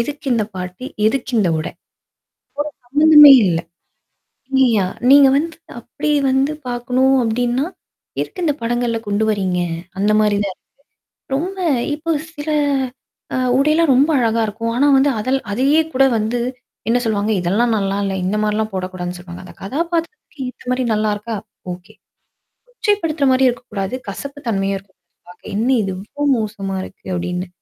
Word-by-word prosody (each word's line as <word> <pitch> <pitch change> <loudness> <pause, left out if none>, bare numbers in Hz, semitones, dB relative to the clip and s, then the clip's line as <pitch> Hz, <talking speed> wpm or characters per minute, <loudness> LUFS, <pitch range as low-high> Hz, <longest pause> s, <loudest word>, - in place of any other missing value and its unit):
எதுக்கு 290 +4 -4
இந்த 220 -2 +1
பாட்டு? 180 +4 -6 0.2
எதுக்கு 250 +2 -1
இந்த 195 -5 +2
உடை? 155 - -4 1.0
ஒரு - - -59
சம்மந்தமே 295 +2 +8
இல்ல. 165 -2 +1 1.0
நீயா 230 -7 +3 0.2
நீங்க 280 0 +8
வந்து 325 +1 -2 0.2
அப்பிடி 240 +5 -3 0.2
வந்து 265 +2 +2 0.2
பார்க்கணும் 255 +2 +1
அப்பிடின்னா, 245 +4 0 0.6
எதுக்கு 365 - -5
இந்த 300 - +2
படங்கள்ல 240 0 0
கொண்டு 205 +1 0
வர்றீங்க? 190 -4 0 0.4
அந்தமாரி 210 +1 +2
தான் 195 - -4
இருக்கு. - - -44 0.7
ரொம்ப 375 +6 -3 0.4
இப்போ 315 +2 -4 0.2
சில 295 0 -5 0.8
அ - - 0 0.2
உடையெல்லாம் 305 +2 +3
ரொம்ப 280 +5 +4
அழகா 230 -1 +1
இருக்கும். 230 +2 -3
ஆனா 280 +3 +3
வந்து 275 +2 +4
அதல் 255 +5 +1
அதையே 275 +8 +3
கூட 270 +1 +4
வந்து 220 +3 -1 0.5
என்ன 240 +2 +3
சொல்லுவாங்க? 215 -1 0
இதெல்லாம் 215 +7 +1
நல்லா 195 -1 -1
இல்ல. 195 - -2
இந்த 195 +3 0
மாரிலாம் 215 +1 0
போடக்கூடாதுன்னு 185 -1 -4
சொல்லுவாங்க. 175 -1 -10
அந்த 180 - -12
கதாபாத்திரத்துக்கு 330 - -3
ஏத்தமாரி 250 0 -3
நல்லா 215 0 +1
இருக்கா? 215 +2 -5 0.4
ஓகே. 180 +1 -11 0.8
கொச்சைப்படுத்துற 410 - 0
மாரியும் 260 0 +4
இருக்கக்கூடாது. 220 -4 -5
கசப்பு 280 0 -6
தன்மையா 195 -2 0
இருக்கக்கூடாது 190 -4 -21
பாக்க, 180 - -16
என்ன 225 +5 0
இது 195 -2 -2
இவ்ளோ 215 +9 -7
மோசமா 205 -3 -4
இருக்கு! 190 - -13
அப்பிடின்னு. 180 +1 -3
230 Hz, 145 wpm, -19 LUFS, 200-275 Hz, 1.0 s, சம்மந்தமே